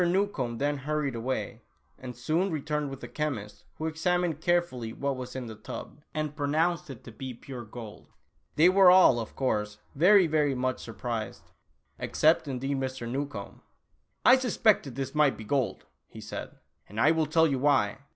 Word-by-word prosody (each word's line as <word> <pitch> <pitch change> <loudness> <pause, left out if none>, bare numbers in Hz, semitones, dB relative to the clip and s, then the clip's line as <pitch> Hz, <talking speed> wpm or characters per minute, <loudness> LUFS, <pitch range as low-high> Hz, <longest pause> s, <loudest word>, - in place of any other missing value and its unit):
Newcombe 175 - 0
then 145 +2 0
hurried 150 0 -1
away, 120 0 -3 0.4
and 125 -2 -8
soon 160 +10 0
returned 150 -1 -2
with 135 0 -9
a - - -5
chemist 120 -10 -4
who 160 - -5
examined 165 0 0
carefully 165 -10 0
what 140 +3 -2
was 130 0 -7
in 130 -2 -4
the 115 - -7
tub, 110 +6 -9
and 155 -1 -3
pronounced 155 +3 0
it 130 -5 -9
to 115 - -10
be 130 +2 -7
pure 125 0 -8
gold! 110 -1 -10 0.5
They 160 +3 +6
were 190 0 +7
all, 180 -9 +7
of 115 - -6
course, 105 -5 -1 0.2
very, 185 +6 +6
very 150 -3 +1
much 130 0 -1
sur 115 - -8
prised, 110 +1 -5 0.5
except, 155 0 +2
indeed, 135 +1 -2
Mr. 130 -2 -4
Newcombe. 140 +4 -5 0.3
" - - -46
I 255 - +8
suspected 215 - +2
this 135 -1 -4
might 150 -2 +3
be 110 - -8
gold," 120 -3 -1 0.2
he - - -12
said, - - -7
" - - -37
and 105 +3 -6
I 145 +6 +5
will 160 -1 +1
tell 160 +2 +4
you 140 -4 0
why. 135 -5 +2
140 Hz, 180 wpm, -28 LUFS, 125-160 Hz, 0.5 s, I